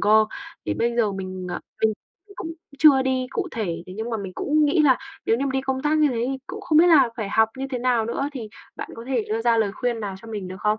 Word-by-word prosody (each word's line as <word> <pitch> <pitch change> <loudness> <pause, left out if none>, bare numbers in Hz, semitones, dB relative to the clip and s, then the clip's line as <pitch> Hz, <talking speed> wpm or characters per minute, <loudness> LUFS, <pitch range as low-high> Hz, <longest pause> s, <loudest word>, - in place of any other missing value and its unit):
cơ. 215 +1 +5 0.4
Thì - - 0
bây 235 +1 0
giờ 215 -4 +2
mình, 185 -1 -5
ờ, - - -3 0.2
mình 220 - +4 0.4
mình 400 - -15
cũng 330 - -5 0.3
chưa 280 -3 +7
đi 260 -1 0
cụ 380 0 -2
thể, 170 -7 -3
thế 185 - -9
nhưng 225 +2 -4
mà 225 - -1
mình 195 -3 -6
cũng 305 +1 +2
nghĩ 305 +2 +3
là 265 -4 +5 0.3
nếu 225 - +3
như 270 - -1
mà - - -1
đi 265 - +1
công 265 0 -2
tác 305 +1 +2
như 300 - +5
thế 235 -3 -1
thì 270 - -2
cũng 415 +4 -7
không 310 -5 +3
biết 345 - +7
là 295 -8 +6
phải 215 -4 -3
học 220 +1 +3
như 270 - -2
thế 250 - -2
nào 240 -3 +1
nữa. 275 +4 -1
Thì 230 -6 -6 0.3
bạn - - -6
có 230 - -9
thể 250 -5 0
đưa 220 +1 -1
ra 235 -1 +3
lời 210 -3 +1
khuyên 240 +1 -2
nào 200 -2 -4
cho 230 - -11
mình 205 -4 -5
được 185 - -7
không? 215 0 +1
235 Hz, 290 wpm, -24 LUFS, 215-270 Hz, 0.4 s, chưa